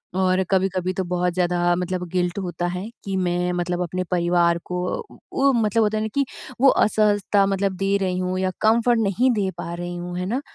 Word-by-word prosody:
और 185 0 +2
कभी-कभी 185 -1 +1
तो 190 - -2
बहुत 180 0 -1
ज़्यादा 175 -1 +1
मतलब 180 0 -3
गिल्ट 180 0 -1
होता 175 -2 -3
है, 180 +2 -4 0.2
कि 195 -1 -3
मैं 180 -1 0
मतलब 175 0 -2
अपने 180 +1 -3
परिवार 175 -1 +2
को 180 0 -3 0.5
उ 275 0 +3
मतलब 225 -1 +2
होता 215 0 +1
है - - -1
ना - - -1
कि 280 0 +2 0.4
वो 270 - +7
असहजता 205 -3 +3
मतलब 195 0 0
दे 195 +1 +1
रही 185 -1 0
हूँ 185 0 -1
या 185 0 0
कम्फर्ट 230 +2 +3
नहीं 225 +5 +2
दे 205 -5 0
पा 170 0 -5
रही 175 0 -5
हूँ, 175 0 -5
है 180 - -2
ना? 240 +8 -1
185 Hz, 205 wpm, -23 LUFS, 175-200 Hz, 0.5 s, वो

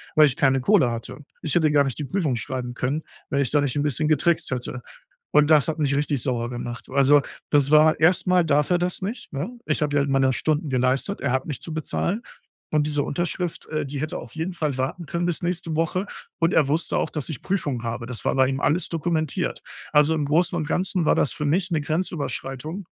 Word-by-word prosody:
weil 155 - +8
ich 135 -4 +1
keine 135 -1 +2
Kohle 165 - +4
hatte. 115 +3 -6 0.2
Ich 155 - -1
hätte 155 -3 +3
gar 145 -1 +5
nicht 135 +1 -3
die 150 - -2
Prüfung 150 -3 0
schreiben 125 +1 -4
können, 135 +5 -2 0.3
wenn 140 - +1
ich 130 - 0
da 145 - +3
nicht 140 -3 -1
'n 145 - +1
bisschen 150 +1 0
getrickst 160 +2 +2
hätte. 125 0 -4 0.5
Und 150 0 +5
das 150 -3 +5
hat 160 0 -2
mich 140 -2 +1
richtig 145 -3 0
sauer 120 -3 -1
gemacht. 120 -1 -6
Also, 140 +2 +5 0.3
das 145 -2 +4
war 155 +1 +5
erst 175 +4 +4
mal 180 -1 +4
darf 150 -1 +2
er 175 - +3
das 180 0 -2
nicht, 230 +6 -5
ne? 145 - -3 0.2
Ich - - 0
habe 145 -1 -1
ja 145 - +4
halt 140 - -1
meine 135 -1 +3
Stunden 155 +2 0
geleistet, 130 +9 0
er 140 - 0
hat 130 0 0
mich 145 -5 -5
zu 165 - -7
bezahlen. 175 +7 -2 0.5
Und 150 -1 +2
diese 150 -1 0
Unterschrift, 175 +3 -3
äh, 155 -1 -2
die 140 0 -5
hätte 155 - -3
auf - - -10
jeden 160 +4 -2
Fall 150 -6 -2
warten 135 +7 -3
können 170 +3 -2
bis 175 +1 0
nächste 175 -2 -2
Woche 175 +4 0 0.3
und 165 0 +2
er 150 -4 +4
wusste 155 +3 0
auch, - - 0
dass 150 -5 -4
ich 155 - -6
Prüfungen 145 -11 -2
habe. 120 +1 -4
Das 125 -2 -6
war - - +1
bei 130 -1 +4
ihm 135 +1 -2
alles 165 +5 +1
dokumentiert. 160 -2 -1 0.3
Also, 150 +2 +5
im 150 - -1
Großen 170 +5 +2
und 155 -3 -2
Ganzen 180 +1 0
war - - +4
das - - +2
für 150 0 -4
mich 175 +5 +1
'ne 160 - +2
Grenzüberschreitung. 155 +1 -3
150 Hz, 230 wpm, -24 LUFS, 135-165 Hz, 0.5 s, weil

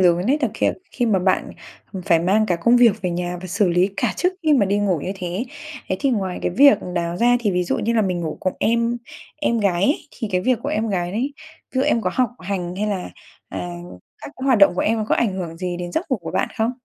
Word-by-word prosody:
lớn 175 0 +3
ấy 290 - +3
thực 260 -7 0
kh - - +2 0.3
khi 245 - 0
mà 210 -4 +3
bạn, 185 +1 +1 0.4
ừm, 190 -3 -5
phải 170 -1 +3
mang 200 +6 +2
cả 175 - +1
công 235 +9 +4
việc 225 -4 +4
về 180 - 0
nhà 175 +1 -3
và 185 - -7
xử 185 +2 +1
lý 180 +3 +2
cả - - 0
trước 360 +1 +1
khi 310 -2 +3
mà 230 -8 +4
đi 200 +2 +1
ngủ 195 -5 +1
như 185 - -3
thế. 185 +4 -4 0.4
Thế 185 - 0
thì 275 - +2
ngoài 190 -6 -1
cái - - 0
việc 280 +10 +6 0.2
đó 170 -1 -1
ra, 240 +5 +4
thì 210 - +1
ví 180 -1 0
dụ - - -1
như 230 - 0
là 225 -2 +3
mình 180 -3 -1
ngủ 160 -2 -4
cùng 185 - 0
em 235 +1 +1 0.4
em 235 -6 0
gái 190 -4 +1
ấy, 280 +9 +3
thì 225 -4 -5
cái 180 - +2
việc 250 +3 +1
của - - -2
em 220 +1 -1
gái 175 -3 -1
đấy, 255 +7 -1 0.4
ví 260 - +1
dụ - - +3
em 280 -5 +2
có 185 - 0
học 255 -2 +2
hành 180 -2 -3
hay 210 - -1
là, 195 -4 -3 0.4
à, 95 - -6 0.6
các - - -7
cái 260 - -6
hoạt 255 -5 +4
động 195 -2 +6
của - - -1
em 225 +1 +1
nó 215 - -1
có - - +4
ảnh 225 -5 +1
hưởng 170 -3 -5
gì 180 0 -3
đến 175 0 -6
giấc 330 - -2
ngủ 260 - +2
của 175 -6 -7
bạn - - 0
không? 225 +2 +2
200 Hz, 280 wpm, -21 LUFS, 180-235 Hz, 0.6 s, việc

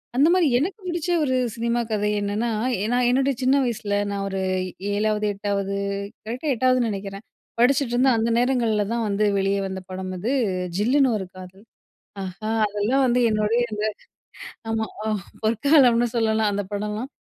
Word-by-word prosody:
அந்த 285 +5 +5
மாரி 360 -4 +4
எனக்கு 365 - -2
பிடிச்ச 345 0 -3
ஒரு 260 -2 +1 0.2
சினிமா 235 +1 0
கதை 210 0 0
என்னன்னா, 210 +4 -1 0.3
எ - - 0
நான் 245 -1 +2
என்னுடைய 270 +2 +2
சின்ன 265 +2 +4
வயசுல, 210 -4 -2
நான் 200 -1 -3
ஒரு 195 -1 -3 0.5
7வது 210 0 0
8வது 200 0 -2 0.5
கரெக்ட்‌டா 255 +6 -2
8வதுன் 255 +1 +3
நெனைக்கிறேன். 195 0 -5 0.4
படிச்சுட்ருந்த 255 0 +3
அந்த 225 +1 +1
நேரங்கள்ல 240 -4 +2
தான் 230 -1 -1
வந்து, 205 +1 +1
வெளிய 195 +1 +1
வந்த 190 0 -5
படம் 185 0 -5
அது. 220 +8 -2 0.5
"ஜில்லுனு 260 +5 +3
ஒரு 190 - -5
காதல்" 185 +2 -12 0.6
ஆஹா! 190 +4 -5 0.2
அதெல்லாம் 215 +7 +1
வந்து 245 0 +2
என்னுடைய 215 +2 +1
அந்த 210 0 -2 0.9
ஆமா. 220 0 0 0.2
ஆ - - 0 0.3
பொற்காலம்னு 240 +1 +4
சொல்லலாம் 220 -2 +2
அந்த 205 0 -1
படம்லாம். 210 +6 -3
220 Hz, 150 wpm, -23 LUFS, 205-250 Hz, 0.9 s, அந்த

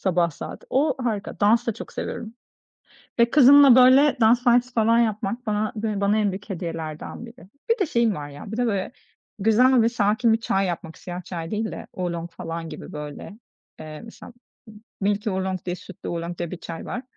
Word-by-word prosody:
Sabah 175 -3 +1
saat. 145 - -9
O, 280 0 +2
harika, 215 -4 -3
dans 225 +4 +3
da 230 - +1
çok - - -9
seviyorum 225 0 -6 0.8
ve 235 0 +4
kızımla, 275 -1 +8
böyle, 260 +3 +6
dans 235 +2 +4
dersi 245 +1 +3
falan 230 0 +3
yapmak 220 +1 -1
bana 210 0 -1
bı 215 -2 -2
bana 200 +2 +2
en 210 -2 +1
büyük 200 +3 -8
hediyelerden 165 +2 -6
biri. 235 -5 -15 0.2
Bir 460 - +3
de 385 - +2
şeyim 235 -5 +1
var 145 -3 -6
ya, 145 +9 -10
bir - - -3
de 245 0 +1
böyle 200 -1 -2 0.5
güzel 235 +4 +4
ve 225 - +3
sakin 225 +1 +2
bir 225 - +1
çay 195 -4 0
yapmak, 165 -2 -5
siyah 180 0 -7
çay 165 -2 -6
değil 220 +1 -2
de, - - -8
Oolong 170 -2 -4
falan 165 0 -6
gibi - - -9
böyle, 150 +7 -8 0.4
eee, 155 -1 -8
mesela 230 +1 -12 0.3
m 220 - -14 0.3
Milky 205 +2 0
Oolong 190 -1 -3
diye 180 0 -2
Sütlü 190 -1 -10
Oolong 170 0 -4
diye 175 -2 -4
bir 185 - -6
çay 165 -1 -8
var. 250 - -4
210 Hz, 195 wpm, -23 LUFS, 175-235 Hz, 0.8 s, kızımla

